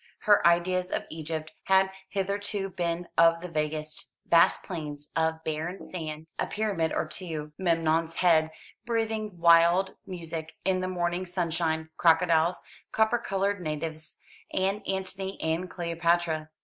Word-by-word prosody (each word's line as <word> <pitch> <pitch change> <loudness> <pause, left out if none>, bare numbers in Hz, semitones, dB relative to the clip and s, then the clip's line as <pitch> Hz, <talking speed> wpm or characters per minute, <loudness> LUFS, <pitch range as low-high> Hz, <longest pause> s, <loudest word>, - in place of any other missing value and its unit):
Her 205 -1 +5
ideas 180 +1 +2
of - - -2
Egypt 160 0 -5
had 190 0 +4 0.2
hitherto 200 0 -2
been 175 -1 -2
of 165 0 +6
the 180 - -5
vaguest. 155 -1 -3 0.2
Vast 170 0 +4
plains 150 -4 -6
of 160 0 0
barren 160 +4 -3
sand, 155 -3 -6
a - - 0
pyramid 200 -7 -1
or - - 0
two, 155 -5 -6
Memnon's 165 -2 +1
head 160 -3 +4 0.3
breathing 220 -4 -2
wild 170 +3 +5
music 165 -3 -6
in 190 -1 +2
the 185 - -1
morning 175 0 -1
sunshine, 165 -3 -1
crocodiles, 165 0 +3 0.3
copper 220 +2 +2
coloured 195 -2 -1
natives, 155 0 -4 0.3
and 195 +2 0
Antony 190 0 -3
and 165 +3 -1
Cleopatra. 170 -2 0
170 Hz, 130 wpm, -28 LUFS, 160-190 Hz, 0.3 s, of